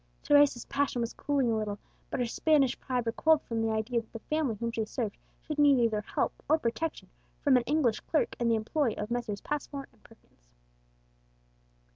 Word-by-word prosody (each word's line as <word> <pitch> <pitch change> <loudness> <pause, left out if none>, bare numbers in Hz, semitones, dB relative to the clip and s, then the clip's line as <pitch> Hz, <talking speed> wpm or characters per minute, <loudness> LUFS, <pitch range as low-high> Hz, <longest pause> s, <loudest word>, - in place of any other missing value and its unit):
Teresa's 285 -4 +4
passion 280 -3 -1
was 230 -1 -2
cooling 275 -5 0
a - - +1
little, 210 -2 -2 0.3
but - - -3
her 245 - +1
Spanish 275 +2 +2
pride 250 -2 -2
recoiled 305 +7 +3
from 230 -1 -2
the 225 - +1
idea 220 +2 0
that 225 - -24
the 225 - -9
family 290 -8 0
whom 235 +2 -3
she 225 -1 -1
served 215 -1 -3 0.3
should 300 -1 -4
need 285 -2 +6
either 225 -3 +2
help - - -1 0.2
or 315 - +5
protection 310 +4 -3 0.4
from 280 -3 +5
an 250 - +5
English 265 -6 +2
clerk 310 - 0
in 240 - +1
the 230 - +4
employ 230 +3 0
of 210 +2 -4
Messrs. 230 -4 -2
Passmore 285 -1 -4
and - - -28
Perkins. - - -23
240 Hz, 190 wpm, -30 LUFS, 225-285 Hz, 0.4 s, need